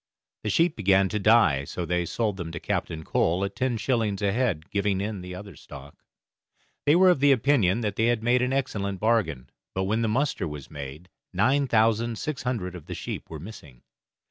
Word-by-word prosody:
The 105 - -1
sheep 165 +7 +2
began 95 -2 +3
to 105 - -2
die, 105 -10 +4
so 85 +5 -5
they 90 +1 0
sold 105 -1 -1
them 85 -3 -5
to 85 - -4
Captain 80 -1 -3
Cole 85 +4 +1
at 100 - -6
ten 130 -2 0
shillings 110 -4 -1
a 100 - +2
head, 100 -9 -1
giving 100 -1 0
in 100 -1 -3
the 90 0 -7
other 100 -2 -9
stock. 70 +1 -12 0.9
They 145 - +6
were 185 +1 +6
of 175 - +1
the 140 +1 +5
opinion 120 -6 +3
that 105 -3 -2
they 110 - +2
had 120 -2 +1
made 125 +2 +3
an 125 +1 0
excellent 100 -8 -2
bargain, 100 - 0 0.2
but 95 - 0
when 110 +4 0
the 115 - +1
muster 130 - 0
was 75 -3 -8
made 75 +3 -8 0.3
nine 135 +9 +2
thousand 115 0 +2
six 150 +2 -4
hundred 110 -8 -3
of 90 -4 -10
the - - -5
sheep - - -6
were 80 - -6
missing. 75 - -12
105 Hz, 205 wpm, -26 LUFS, 90-120 Hz, 0.9 s, They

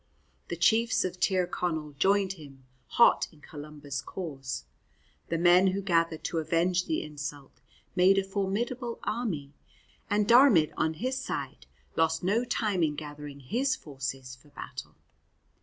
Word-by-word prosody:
The 170 - -3
chiefs 220 +7 +3
of 180 0 -4
Tir 185 -2 +2
Connell 160 -4 -3
joined 190 +6 +2
him, 140 -6 -14 0.2
hot 235 - +5
in 155 - -20
Columba's 145 -2 -7
cause. 135 - -6 0.6
The 165 - -1
men 175 +2 +6
who 190 +1 0
gathered 165 -3 +1
to 165 - -1
avenge 175 +3 +1
the 320 - -1
insult 145 -2 -8 0.3
made 190 +2 +5
a 195 - +3
formidable 225 +5 -2
army, 175 - -3 0.6
and 205 0 +2
Diarmaid 235 - +6
on 160 0 0
his 255 +8 -2
side - - -5 0.3
lost 160 0 +1
no 210 +6 +2
time 215 -6 0
in 150 -2 +1
gathering 145 -1 -8
his 255 - 0
forces 130 -3 -6
for 130 +4 -22
battle. 145 - -9
170 Hz, 140 wpm, -29 LUFS, 150-200 Hz, 0.6 s, men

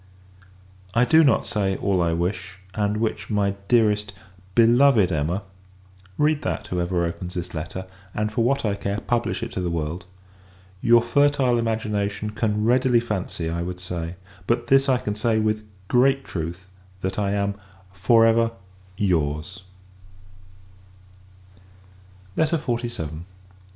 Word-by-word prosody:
I 120 +1 +5
do 160 +4 +6
not 135 -7 +3
say, 95 -2 0
all 95 -3 +1
I 85 -1 +1
wish; 90 +2 -3 0.2
and 105 0 0
which, 110 0 -2
my 100 -2 +1 0.2
dearest 105 -3 +2 0.4
beloved 120 -3 +5
Emma 85 +5 -1 0.7
(read 150 0 +2
that, 110 - -3
whoever 90 -2 -1
opens 85 +2 -5
this 90 0 -5
letter; 85 +4 -5 0.3
and, 105 0 -1
for 115 0 +1
what 135 +1 +1
I 105 - +1
care, 100 +1 -3
publish 120 -1 -1
it - - -5
to 95 - -3
the 90 - -1
world) 85 +2 -3 0.8
your 120 0 +5
fertile 135 -1 +3
imagination 105 -2 -2
can 105 -1 -1
readily 125 0 +4
fancy 95 -7 -3
I 85 +1 -2
would 90 +1 -5
say: 90 -1 -5 0.3
but 120 0 +1
this 135 0 +4
I 130 - +4
can 105 -4 -3
say, 110 +1 +1
with 110 0 0 0.2
great 135 +4 +3
truth, 85 +2 -5 0.4
that 95 +2 -2
I 100 -1 0
am, 100 0 0 0.4
FOR 115 +4 +4
EVER, 115 0 +4 0.5
YOUR'S 80 -2 -1 2.7
LETTER 160 +1 +2
XLVII. 120 - -3
105 Hz, 135 wpm, -23 LUFS, 90-120 Hz, 2.7 s, do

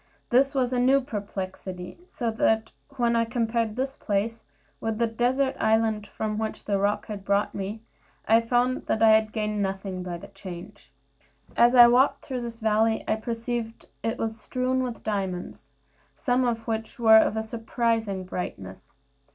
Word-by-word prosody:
This 270 +3 +4
was 255 -1 +1
a 250 - +1
new 265 +3 +5
perplexity; 190 - -6
so 235 -2 -2
that 220 0 +1 0.3
when 235 -1 +2
I 230 - +3
compared 230 -2 -1
this 265 +2 -2
place 220 +2 -2 0.4
with 225 -1 -2
the 235 - +2
desert 250 +4 +1
island 220 -1 +1
from 215 +1 -3
which 220 0 -4
the 200 -1 0
roc 205 +1 0
had 205 -2 -7
brought 200 +1 +1
me, 205 +3 -5 0.4
I 225 +1 +5
found 245 +2 0
that 220 - +1
I 220 - +8
had 220 0 +4
gained 210 -1 -2
nothing 190 -1 -3
by 180 -1 -5
the - - -12
change. 195 0 -10 0.6
As 240 +2 +5
I 240 -1 +10
walked 250 +3 +3
through 255 -3 -4
this 235 -1 -7
valley, 220 +1 +2
I - - +2
perceived 230 0 -4 0.2
it 225 0 -2
was 225 0 -3
strewn 255 +3 -1
with 245 -2 -4
diamonds, 190 -4 -4 0.5
some 255 -2 +1
of 230 -1 -2
which 220 -1 -3
were 220 -2 +7
of 220 - +1
a 220 - -1
surprising 225 -3 -1
bigness. 95 - -7
225 Hz, 165 wpm, -26 LUFS, 205-240 Hz, 0.6 s, I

